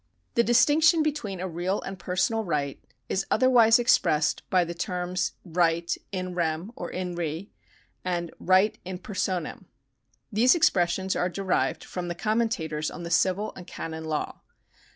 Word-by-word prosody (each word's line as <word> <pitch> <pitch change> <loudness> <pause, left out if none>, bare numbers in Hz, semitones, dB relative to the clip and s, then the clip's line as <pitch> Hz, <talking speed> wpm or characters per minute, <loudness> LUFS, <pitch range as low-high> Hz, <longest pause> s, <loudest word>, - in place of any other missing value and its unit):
The 235 - +4
distinction 305 +7 +5
between 280 - -2
a 185 - -3
real 180 +3 -2
and 195 - -5
a - - -10
personal 190 +6 0
right 145 -7 -2 0.2
is 190 - 0
other 255 0 +3
wise 230 -2 +7
expressed 160 -11 +2
by 185 -1 +4
the 170 - -5
terms 180 +1 -2
right 170 -1 +1 0.2
in 185 -2 -3
rem 170 +3 -2
(or 175 - -6
in 180 -1 -4
re) 170 +2 -4 0.5
and 175 -2 -2
right 190 +3 +3
in 185 0 -5
personam. 185 -3 -3 0.7
These 235 +7 +5
expressions 190 - +2
are 180 - 0
derived 190 0 -1
from 180 -1 -5
the 175 - -3
com 215 +5 0
mentators 160 -9 -1
on 175 - -8
the 170 - -6
civil 190 +4 +1
and 180 - -10
canon 160 0 -6
law. 155 -1 -3
185 Hz, 160 wpm, -26 LUFS, 170-210 Hz, 0.7 s, wise